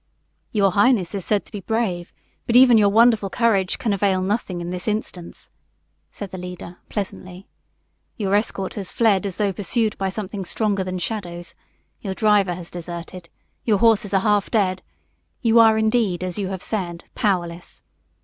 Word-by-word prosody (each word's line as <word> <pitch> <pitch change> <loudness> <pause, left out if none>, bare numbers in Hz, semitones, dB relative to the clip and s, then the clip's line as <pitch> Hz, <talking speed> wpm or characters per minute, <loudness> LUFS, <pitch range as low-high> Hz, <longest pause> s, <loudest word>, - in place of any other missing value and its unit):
"Your 200 -3 +3
highness 205 -2 +3
is 195 -2 -3
said 210 -2 +1
to - - -17
be 210 - -5
brave, 195 -4 -2 0.4
but 235 - 0
even 250 -1 +8
your 205 -1 +5
wonderful 225 -1 +4
courage 200 -4 +1
can 220 - -1
avail 195 -1 +1
nothing 195 -2 -2
in 175 0 -5
this 180 +2 -5
instance," 210 -5 -4 0.6
said 200 -2 -8
the 185 - -6
leader, 180 -1 -8
pleasantly. 185 -2 -6 0.7
"Your 200 -3 -1
escort 205 -2 0
has 195 -4 -4
fled 205 -4 +2
as 190 - -5
though 205 -2 0
pursued 215 +2 0
by 195 0 0
something 200 0 -5
stronger 200 +1 -1
than 185 0 -4
shadows; 175 -3 -5 0.5
your 195 -3 -4
driver 205 -4 +3
has 175 -1 -10
deserted; 170 0 -8 0.3
your 215 -3 +2
horses 220 -1 +3
are 195 -1 +3
half 205 -1 +2
dead; 190 -4 +1 0.6
you 230 0 +5
are 220 -1 +6
indeed, 220 -5 +1
as 180 -1 -3
you 195 - -1
have 190 -1 -5
said, 175 -6 -3
powerless. 175 -4 -2
195 Hz, 170 wpm, -22 LUFS, 180-215 Hz, 0.7 s, even